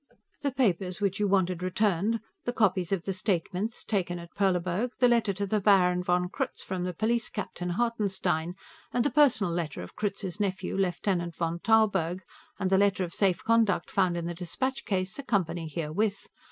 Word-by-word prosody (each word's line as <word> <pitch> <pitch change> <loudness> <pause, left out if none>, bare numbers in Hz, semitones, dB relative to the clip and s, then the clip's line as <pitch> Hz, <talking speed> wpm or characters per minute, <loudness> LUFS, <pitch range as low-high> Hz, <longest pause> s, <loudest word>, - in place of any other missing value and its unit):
The 285 - +1
papers 190 -8 +1
which 200 -1 0
you 205 - +2
wanted 185 -3 +1
returned 200 +3 +1 0.2
the 245 - -1
copies 190 -6 +1
of 190 -4 0
the 195 - -2
statements 190 +2 -2
taken 180 -4 -1
at 170 0 -10
Perleburg, 190 +4 0
the 250 - +5
letter 235 -4 +3
to 200 +2 -2
the 210 +1 0
Baron 180 -3 +4
von 180 0 +1
Krutz 265 +8 -4
from 185 -1 -3
the 180 - -3
police 230 +4 0
captain, 180 -4 -4
Hartenstein, 190 -5 -1 0.4
and 245 -1 +1
the 290 - +2
personal 240 - +4
letter 160 - -3
of 90 - -11
Krutz's 200 -2 -3
nephew, 195 -2 -1
Lieutenant 180 -2 0
von 165 0 -2
Tarlburg, 200 -5 +2 0.4
and 190 -1 -1
the 190 - +5
letter 200 -2 +3
of 170 -1 -5
safe 190 -3 +1
conduct 220 -6 +2
found 185 -3 +2
in 170 - -3
the 175 - -3
dispatch 190 +10 -3
case 190 +2 -2
accompany 175 -10 -1
herewith. 170 +7 -2
190 Hz, 180 wpm, -28 LUFS, 175-215 Hz, 0.4 s, the